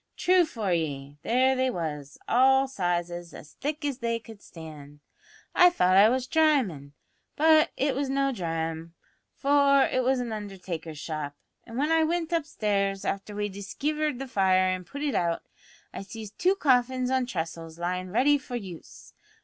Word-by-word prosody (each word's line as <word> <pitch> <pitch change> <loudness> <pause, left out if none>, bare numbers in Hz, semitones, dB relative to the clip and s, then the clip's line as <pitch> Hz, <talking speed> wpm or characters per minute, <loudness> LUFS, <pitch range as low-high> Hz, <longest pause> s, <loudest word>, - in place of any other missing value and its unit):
True 365 -1 +4
for 215 - -2
ye, 145 -4 -3
there 260 +3 +2
they 260 0 +1
was, 150 - -5
all 265 +2 +4
sizes, 175 -6 -3
as 150 - -12
thick 295 +1 -3
as 275 -3 -2
they 230 -1 -1
could 225 -2 -13
stand. 150 -3 -11 0.5
I 360 - +7
thought 185 - +2
I 200 +3 +7
was 255 +1 0
dramin', 255 - +1 0.4
but 315 0 +5
it 275 0 +1
was 275 0 -2
no 275 0 +1
drame, 165 -4 -4 0.4
for 280 -1 +4
it 255 - +1
was 260 +1 +2
an 240 -2 -3
undertaker's 180 -6 -6
shop; 150 -1 -5 0.3
an' 230 0 -8
when 295 +4 +1
I 325 0 +4
wint 335 +1 -1
upstairs, 200 -11 -1
after 200 +1 -3
we 205 0 -1
diskivered 290 +9 -3
the 270 +1 -6
fire 185 -5 +3
an' 185 -1 -3
put 285 +11 -7
it 290 -3 0
out, 170 -4 0 0.5
I - - -6
sees 210 +1 -9
two 370 - +1
coffins 255 -5 +2
on 260 -1 +1
tressels 165 -4 -5
lyin' 180 +1 -3
ready 270 +8 +3
for 255 -2 -7
use. 190 -8 -9
220 Hz, 165 wpm, -27 LUFS, 175-275 Hz, 0.5 s, I